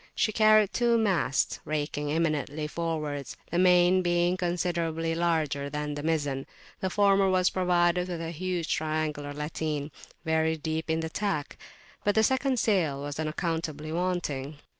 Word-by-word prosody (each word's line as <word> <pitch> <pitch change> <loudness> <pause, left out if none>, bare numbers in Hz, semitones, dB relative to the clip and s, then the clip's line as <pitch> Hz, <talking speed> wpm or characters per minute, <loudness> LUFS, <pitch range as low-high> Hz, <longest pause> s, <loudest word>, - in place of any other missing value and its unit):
She 215 - +1
carried 215 -1 +5
two 235 -1 +3
masts, 190 - +1
raking 150 -1 -2
imminently 155 -1 -1
forwards, 150 -4 -3
the 170 - +1
main 180 0 +5
being 175 0 +2
considerably 170 -2 -1
larger 155 -4 0
than 150 0 -3
the 145 - -5
mizzen; 145 -4 -1 0.3
the 190 - -1
former 195 0 +3
was 185 -1 +3
provided 180 -1 +2
with 175 -2 -4
a 165 0 -4
huge 175 0 -3
triangular 155 -2 -2
latine, 150 0 -3 0.3
very 160 0 +1
deep 160 +1 -3
in 160 0 +1
the 160 - -3
tack, 195 -8 -2 0.5
but 205 - +1
the 220 - +4
second 265 +2 +2
sail 180 -11 +1
was 145 +1 -5
unaccountably 155 -1 -3
wanting. 160 -5 -2
165 Hz, 145 wpm, -28 LUFS, 150-180 Hz, 0.5 s, carried